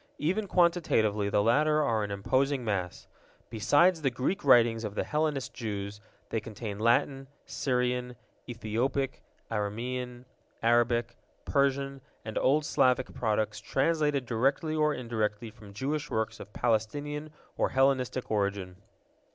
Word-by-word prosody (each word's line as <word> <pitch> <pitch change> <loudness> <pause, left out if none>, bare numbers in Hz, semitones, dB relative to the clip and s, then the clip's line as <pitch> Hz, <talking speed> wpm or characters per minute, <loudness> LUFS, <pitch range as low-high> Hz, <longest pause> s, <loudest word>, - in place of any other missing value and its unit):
Even 190 +8 -1
quantitatively 155 - +2
the 100 0 +2
latter 150 +6 +3
are 115 -6 +1
an 105 - -3
imposing 130 +6 0
mass. 95 -5 -2 0.5
Besides 160 - +3
the 135 - +2
Greek 130 - -2
writings 115 -1 +5
of 105 -2 -5
the - - 0
Hellenist 150 -3 -1
Jews, 105 -3 -5 0.3
they 115 - -1
contain 105 -1 -7
Latin, 135 +4 +2 0.2
Syrian, 125 -1 -1 0.3
Ethiopic, 120 +4 -2 0.3
Aramean, 120 +4 -3 0.4
Arabic, 120 0 +2 0.3
Persian, 140 -1 0 0.2
and 110 - -6
Old 150 +3 +2
Slavic 130 -3 +2
products 110 -2 -1
translated 150 -2 +1
directly 135 +7 0
or 155 -1 +2
indirectly 110 -4 -2
from 105 -1 -14
Jewish 145 +8 -3
works 110 0 -2
of 100 - -10
Palestinian 145 +8 -1 0.3
or - - +1
Hellenistic 130 -2 +1
origin. 100 -3 -1
125 Hz, 125 wpm, -29 LUFS, 110-140 Hz, 0.5 s, writings